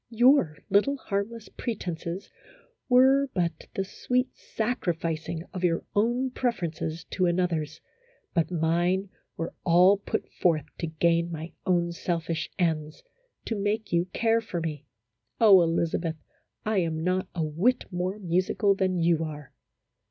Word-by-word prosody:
Your 240 - +4
little, 245 +9 +3
harmless 215 0 -3
pretenses 180 -5 -5 0.6
were 265 +2 +5
but 175 -2 -1
the 195 - 0
sweet 250 +6 -1
sacrificing 170 -8 -2
of 185 -2 -5
your 165 -2 +2
own 240 +5 +1
preferences 170 -10 -2
to 185 -2 +1
another's, 170 -3 -1 0.5
but 165 -2 +1
mine 175 +3 +1 0.3
were 165 - -4
all 180 +3 +6
put 200 - -3
forth 160 -5 +1
to 165 - -2
gain 170 +2 +1
my 160 +1 -6
own 175 -2 +2
selfish 165 -1 -2
ends, 155 -4 -1 0.4
to - - -2
make 205 0 -2
you 170 0 +3
care 225 +5 +1
for 195 -6 -4
me. 155 -4 -5 0.5
Oh, 200 -5 +8
Elizabeth, 165 -1 0 0.5
I 215 -2 +2
am 160 -2 -1
not 185 +1 0
a 165 - 0
whit 180 +12 +1
more 180 +2 -2
musical 185 +2 +1
than 190 -2 0
you 165 -1 +2
are 150 -3 -7
180 Hz, 135 wpm, -27 LUFS, 165-205 Hz, 0.6 s, Oh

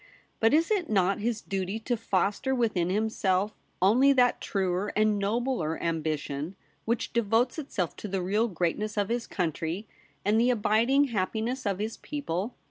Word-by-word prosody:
But 225 - +4
is 325 +7 +3
it 395 -5 +1
not 195 -1 +2
his 225 +1 -1
duty 195 +1 -3
to 240 +2 0
foster 210 +3 0
within 210 -8 +1
himself 205 -1 +1 0.3
only 250 +8 +6
that 250 -2 +3
truer 190 0 -1
and 215 -1 +3
nobler 205 -5 -1
ambition 155 0 -2 0.3
which 230 +1 -1
devotes 235 +4 +2
itself 190 - -3
to - - -6
the 190 -2 -2
real 210 +5 +1
greatness 200 +3 -2
of 205 0 +1
his 235 0 -1
country, 170 +3 -2 0.4
and 215 +3 +3
the 245 - +3
abiding 235 +4 +3
happiness 225 +4 -1
of 195 -2 0
his 215 +3 -3
people 230 - -4
210 Hz, 155 wpm, -28 LUFS, 185-235 Hz, 0.4 s, only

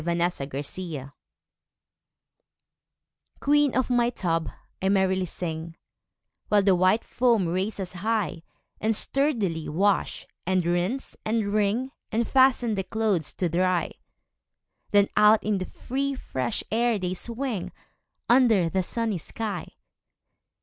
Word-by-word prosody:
8 170 0 -1
Autoplay 145 -2 -3 2.3
Queen 290 -1 +3
of 260 0 +1
my 240 -1 +3
tub, 165 -8 -1 0.3
I 190 - +1
merrily 190 -1 +2
sing, 165 -1 -5 0.7
While 205 -1 +4
the 195 -1 +5
white 185 +5 +3
foam 235 -7 +2
raises 185 +1 -2
high, 205 -2 -1 0.4
And 220 +1 +1
sturdily 215 - 0
wash, 195 +6 +1 0.2
and 185 -1 +1
rinse, 175 +10 -1
and 215 -2 0
wring, 215 +5 +1 0.2
And 230 +1 0
fasten 260 -3 +4
the 195 -2 -1
clothes 200 -5 0
to 180 - -1
dry; 180 +1 +1 1.0
Then 205 -1 +4
out 210 +1 +6
in 210 -2 0
the 185 - -3
free 275 +2 -3
fresh 130 - -3
air 235 0 +2
they 185 -2 -2
swing, 235 +1 -3 0.6
Under 230 -8 +4
the 190 +3 0
sunny 220 0 -2
sky. 215 +6 -5
200 Hz, 120 wpm, -26 LUFS, 175-230 Hz, 2.3 s, out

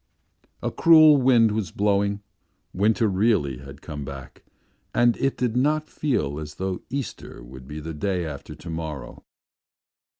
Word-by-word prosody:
A - - -1
cruel 155 -3 +7
wind 125 -4 +4
was 105 -4 -2
blowing, 100 +1 0 0.5
winter 110 +4 +2
really 95 - +1
had 70 +1 -12
come 75 -3 -6
back 65 -2 -10 0.5
and 120 0 +4
it 135 0 0
did 125 -2 -1
not 150 +4 +1
feel 120 - -1
as 75 -1 -8
though 95 -1 -3
Easter 130 - -6
would 65 +1 -12
be 75 +2 -7
the 80 +2 -6
day 90 +3 -2
after 75 -4 -7
to 85 - -11
morrow. 80 -3 -6
100 Hz, 145 wpm, -24 LUFS, 75-120 Hz, 0.5 s, cruel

